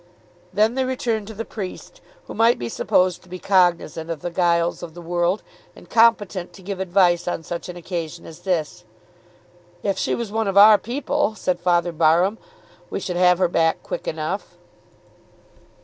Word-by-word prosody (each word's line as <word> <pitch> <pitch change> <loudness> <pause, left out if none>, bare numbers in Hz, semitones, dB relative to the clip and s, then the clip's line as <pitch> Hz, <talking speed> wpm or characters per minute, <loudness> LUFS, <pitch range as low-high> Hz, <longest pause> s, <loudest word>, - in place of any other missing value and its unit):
Then 215 +4 +2
they 265 +1 0
returned 235 -5 -2
to 220 - -9
the 225 +2 -5
priest, 215 - -8 0.2
who - - -8
might 230 +2 +3
be 120 - -5
supposed 180 +8 +1
to 185 - -21
be 185 - -6
cognisant 175 -4 +1
of 165 -3 -4
the 175 - -3
guiles 170 -1 +1
of 170 -2 -9
the - - -9
world 175 +3 0 0.3
and - - -16
competent 210 -6 +2
to 190 - -14
give 195 0 -5
advice 180 -2 +2
on 170 -2 -2
such 170 +2 -6
an 180 - -7
occasion 170 -1 -5
as 160 - -11
this. 165 -6 -2 1.0
"If 195 -2 -1
she - - 0
was 235 -3 -5
one 220 0 -1
of 195 0 -1
our 210 +1 +9
people," 270 0 -1
said 185 -3 -1
Father 175 0 +1
Barham, 170 +6 +2 0.5
"we - - -3
should 180 - -4
have 180 0 +5
her 185 0 +3
back 165 -1 +1
quick - - -6
enough." - - -4
185 Hz, 180 wpm, -22 LUFS, 175-215 Hz, 1.0 s, our